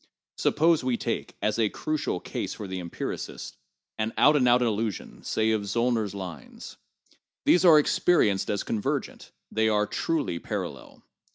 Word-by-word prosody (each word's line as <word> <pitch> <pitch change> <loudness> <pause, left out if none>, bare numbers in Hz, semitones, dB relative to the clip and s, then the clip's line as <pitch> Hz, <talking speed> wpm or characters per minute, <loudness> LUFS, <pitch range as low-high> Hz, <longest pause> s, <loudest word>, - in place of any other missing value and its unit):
Suppose 165 -1 +2
we 125 -2 0
take, - - -3
as 105 +2 0
a 110 -2 +3
crucial 155 -11 -2
case - - -5
for 105 - -7
the 95 0 -4
empiricist, 85 -1 -6 0.4
an 110 +1 -1
out 150 +1 +6
and 130 -4 +3
out 125 +1 +5
illusion, 110 -2 -2
say 110 0 +1
of 110 -1 +1
Zbllner 115 +2 0
's 100 - -9
lines. 95 -4 -8 0.7
These 180 - +5
are 165 -3 +9
experienced 145 - +2
as 100 - -1
convergent; 105 -2 -3 0.2
they 110 0 +2
are 105 -1 +2
'truly' 140 - -2
parallel. - - -6
110 Hz, 155 wpm, -27 LUFS, 100-130 Hz, 0.7 s, are